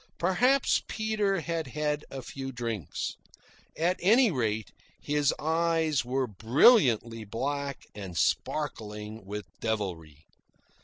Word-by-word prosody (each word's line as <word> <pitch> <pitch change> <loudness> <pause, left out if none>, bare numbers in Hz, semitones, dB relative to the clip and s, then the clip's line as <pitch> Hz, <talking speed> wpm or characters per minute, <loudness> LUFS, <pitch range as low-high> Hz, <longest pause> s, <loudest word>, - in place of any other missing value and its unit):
Perhaps 250 +10 +3
Peter 210 -4 0
had 165 -2 -3
had 150 +2 -2
a 135 -1 -7
few 135 +2 -6
drinks. 115 - -4 0.6
At 175 +3 +1
any 225 +4 +5
rate, 110 - -1 0.3
his 145 -1 +1
eyes 160 -2 +1
were 130 +2 0
brilliantly 115 - +4
black 140 +6 -3
and 95 -4 -7
sparkling 110 - -2
with 105 0 -5
devilry. 85 -9 -3
135 Hz, 105 wpm, -29 LUFS, 110-165 Hz, 0.6 s, any